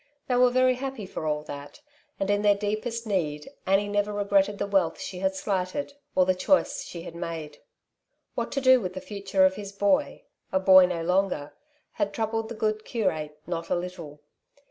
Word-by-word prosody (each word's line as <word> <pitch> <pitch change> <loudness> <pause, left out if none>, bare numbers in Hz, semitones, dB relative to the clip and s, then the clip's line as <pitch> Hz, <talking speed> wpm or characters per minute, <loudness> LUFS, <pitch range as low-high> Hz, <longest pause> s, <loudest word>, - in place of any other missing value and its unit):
They 250 - +1
were 250 0 +6
very 255 +1 +4
happy 265 -4 -5
for 160 -4 -5
all 150 0 -1
that, 145 - -9 0.4
and 195 +1 0
in 205 0 +2
their 205 -1 +5
deepest 215 +3 -3
need 155 -8 -1 0.2
Annie 195 +2 +3
never 205 0 0
regretted 200 0 +2
the - - -1
wealth 195 -5 +1
she 185 - -6
had 190 0 0
slighted, 190 +8 -2 0.2
or 185 - +5
the 185 - +3
choice 275 +10 +2
she 170 -1 -8
had - - -8
made. 160 -3 -6 0.7
What - - -3
to 275 - 0
do 260 -1 +6
with 185 -2 -4
the - - -3
future 195 -1 +1
of 190 0 +2
his 200 -1 -6
boy 200 -1 +1
— - - -47
a 190 - +2
boy 185 -1 +7
no 170 -2 -3
longer 180 -4 0 0.2
— 300 - -32
^had 305 - 0
troubled 225 0 -2
the 235 - -6
good 215 0 -1
curate 155 -11 -2
not 170 -1 -4
a - - +2
little. 170 -4 -6
195 Hz, 200 wpm, -27 LUFS, 180-215 Hz, 0.7 s, boy